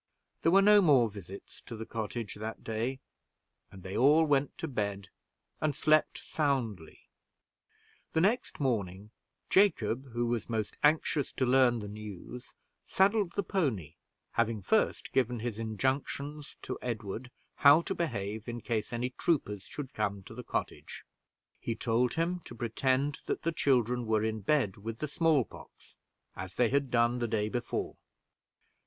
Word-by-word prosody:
There 165 - +3
were 195 +2 +6
no 210 0 +7
more 135 - +5
visits 100 -1 -11
to 115 - -6
the 110 0 -6
cottage 115 0 -4
that 110 +2 -6
day, 115 +4 -2 0.7
and 95 -1 -13
they 95 +1 -6
all 150 +5 +5
went 140 -2 +1
to 165 - -3
bed, 100 - -3 0.5
and 155 -3 +1
slept 155 +1 +3
soundly. 120 - -2 1.1
The 160 - +3
next 225 +7 +1
morning, 105 -6 -2 0.4
Jacob, 130 - +2
who 120 0 0
was 120 -1 -2
most 110 -3 -2
anxious 150 -1 +2
to 130 - 0
learn 125 -1 +4
the 105 - -6
news, 105 +3 -9 0.3
saddled 195 -1 +2
the 200 - 0
pony, 130 - -1 0.4
having 115 -3 0
first - - +1
given 125 -2 +1
his 115 -2 -3
injunctions 135 +6 -2
to - - -5
Edward 115 +1 -4 0.3
how 145 +4 +7
to - - -2
behave 110 - -3
in 120 0 -4
case 115 -2 -2
any 120 +1 -2
troopers 115 - -1
should 140 -2 -7
come 100 -2 -2
to 105 - -11
the 125 +2 -7
cottage. - - -4 0.6
He 115 - -3
told 120 +2 +1
him 170 +2 0
to 120 - -9
pretend 130 +5 0
that - - -2
the 165 - +1
children 125 -6 +1
were 110 -1 +2
in 110 0 -1
bed 110 -2 +1
with 110 +2 -6
the 150 - -3
small 150 -4 +2
pox, - - -15 0.4
as 95 +1 -7
they 120 -2 +3
had 140 +1 +1
done 120 0 +2
the 120 - 0
day 105 -1 0
before. 120 +1 -3
120 Hz, 155 wpm, -31 LUFS, 110-145 Hz, 1.1 s, no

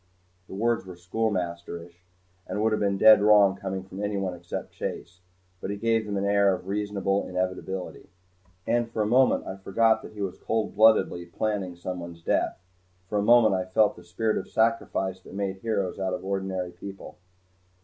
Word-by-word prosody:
The - - -8
words 115 +3 +1
were 95 -1 -10
schoolmasterish 90 -3 -3 0.5
and 105 - -3
would 110 - +3
have 110 - 0
been 100 -1 +1
dead 110 0 +8
wrong 105 -2 +6
coming 95 -1 -4
from 95 +1 -8
anyone 100 -3 -1
except 85 0 -6
Chase. 90 +1 -6 0.4
But - - -4
he 100 - -3
gave 115 0 +1
them 100 -1 -2
an 100 - -1
air 100 -1 +4
of 90 - -11
reasonable 100 -1 -1
inevitability. 95 0 -4 0.6
And 120 0 +1
for 110 -2 -1
a - - -1
moment 125 +4 +3
I 95 - -6
forgot 110 +3 +2
that - - -11
he 105 - -7
was 95 - -5
cold 110 -1 -2
bloodedly 100 -5 +4
planning 95 0 -2
someone's 85 -1 -7
death. - - 0 0.5
For 105 - 0
a - - +2
moment 115 0 +6
I 95 -1 0
felt 105 +3 +3
the 90 - -14
spirit 110 +6 -1
of - - -8
sacrifice 110 -4 0
that 95 - -13
made 100 -1 -2
heroes 100 -2 -2
out 95 -1 -1
of 90 - -8
ordinary 95 -2 -2
people. 95 +2 -10
100 Hz, 180 wpm, -26 LUFS, 95-110 Hz, 0.6 s, dead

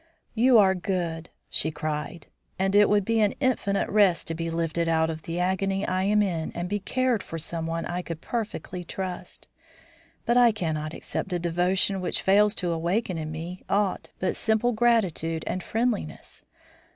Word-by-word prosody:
"You 240 +2 +5
are 195 -3 +6
good," 175 -3 -3 0.2
she 155 - +1
cried, 155 +1 -4 0.3
"and 190 +1 0
it 205 0 +6
would 205 -2 +3
be 230 +1 +1
an 210 -2 +2
infinite 250 -7 +1
rest 200 -5 +3
to - - -1
be 165 +1 -3
lifted 165 0 -1
out 160 0 +2
of 160 0 -7
the 165 +2 -4
agony 190 +2 0
I 185 +1 0
am 210 +1 +3
in 170 -5 -2
and 175 +1 -3
be 205 +2 -1
cared 250 +2 0
for - - -8
by - - -1
someone 165 0 -3
I 175 +1 -3
could 165 -3 -6
perfectly 210 -4 -4
trust. 180 0 -6 0.8
But 235 +1 +3
I 240 -2 +6
cannot 160 -5 -3
accept 190 - -4
a - - +1
devotion 180 +3 +1
which 180 - -2
fails 210 +2 +4
to 175 -4 -1
awaken 170 +2 -1
in 155 0 -4
me 170 +4 -6
aught 200 -1 0
but 185 - -1
simple 220 +2 +2
gratitude 205 -9 +1
and 185 - -2
friendliness. 225 - -3
185 Hz, 175 wpm, -26 LUFS, 165-210 Hz, 0.8 s, are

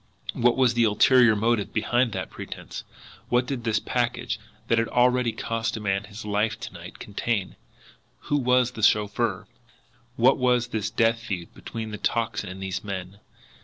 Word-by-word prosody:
What 120 +1 +2
was 130 -2 +4
the 120 0 +3
ulterior 115 +2 +5
motive 110 0 +1
behind 120 +3 +1
that 95 -3 -4
pretence? - - -8 0.5
What 120 0 +3
did 125 -2 -4
this 110 -2 +1
package, 120 +1 -1 0.3
that 115 - +3
had 115 - +1
already 125 -1 +3
cost 115 0 -2
a - - -5
man 100 -1 -1
his 105 +1 -9
life 105 +2 0
to - - -7
night, - - -10
contain? 100 -1 -2 0.7
Who 145 - 0
was 125 -2 +3
the 115 - -8
chauffeur? 105 -1 +2 0.7
What 130 +4 +4
was 125 -1 +2
this 110 -2 -2
death 115 +1 +2
feud 95 -7 -5
between 110 -1 -6
the 105 - -6
Tocsin 115 -4 -1
and 95 +1 -7
these 95 0 -3
men? 100 -1 -6
115 Hz, 165 wpm, -25 LUFS, 105-120 Hz, 0.7 s, ulterior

